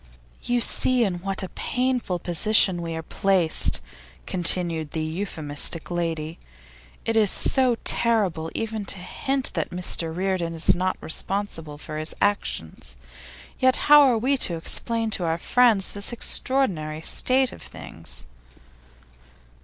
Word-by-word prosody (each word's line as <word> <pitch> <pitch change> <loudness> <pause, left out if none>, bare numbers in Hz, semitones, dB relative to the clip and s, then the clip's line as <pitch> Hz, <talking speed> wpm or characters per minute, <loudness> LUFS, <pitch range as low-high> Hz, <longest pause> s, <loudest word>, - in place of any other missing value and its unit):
'You 245 0 0
see 255 +1 +3
in 185 -5 -2
what 195 0 -3
a 185 - -5
painful 250 -7 -2
position 180 +1 +2
we 165 -1 -5
are 160 - -5
placed,' 185 -2 +1 0.4
continued 170 -4 0
the 160 - -2
euphemistic 160 -2 -1
lady. 165 -2 -3 0.7
'It 225 - -1
is 215 -3 +3
so 255 +2 +2
terrible 195 -9 +1
even 220 -1 -3
to 195 - -1
hint 265 +9 -1
that - - -2
Mr 175 -2 -2
Reardon 180 -1 -2
is 165 - +3
not 185 +1 -2
responsible 165 -4 -3
for 155 +1 -7
his 155 +1 -3
actions, 195 - -2 0.6
yet 260 0 +4 0.2
how 295 0 +10
are 260 -5 +4
we 265 +5 +1
to 175 -9 +3
explain 225 +6 -1
to 190 - +1
our 165 0 0
friends 225 0 +3
this 200 +2 -1
extraordinary 185 - 0
state 260 +7 +3
of - - -12
things? 80 +2 -9
185 Hz, 135 wpm, -24 LUFS, 165-225 Hz, 0.7 s, how